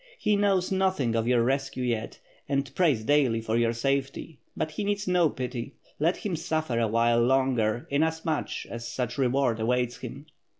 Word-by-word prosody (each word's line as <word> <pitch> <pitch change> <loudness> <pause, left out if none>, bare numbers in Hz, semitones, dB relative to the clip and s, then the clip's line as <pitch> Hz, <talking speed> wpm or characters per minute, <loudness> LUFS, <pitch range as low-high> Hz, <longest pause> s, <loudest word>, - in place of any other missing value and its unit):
He 210 -1 +1
knows 195 -3 +2
nothing 190 -11 +1
of 115 0 0
your 120 -1 +3
rescue 135 0 -1
yet, 115 -3 -2 0.3
and 140 -2 -1
prays 145 -11 +2
daily 135 -3 +3
for 110 0 -2
your 115 -1 +2
safety 135 +5 -2
— - - -26
• - - -8
l)ut 155 - -1
he 205 - -4
needs 205 0 -1
no 180 -3 +3
pity. 125 -1 -5 0.2
Let 165 +5 +2
him 195 -5 -3
suffer 160 -6 -1
a 115 - +2
while 115 +2 +3
longer 120 -3 +1
inas 160 +3 0
much 160 -2 -2
as 115 0 -5
such 125 +1 -3
reward 130 -3 +1
awaits 125 +1 0
him." 140 +2 -8
135 Hz, 185 wpm, -27 LUFS, 120-160 Hz, 0.3 s, your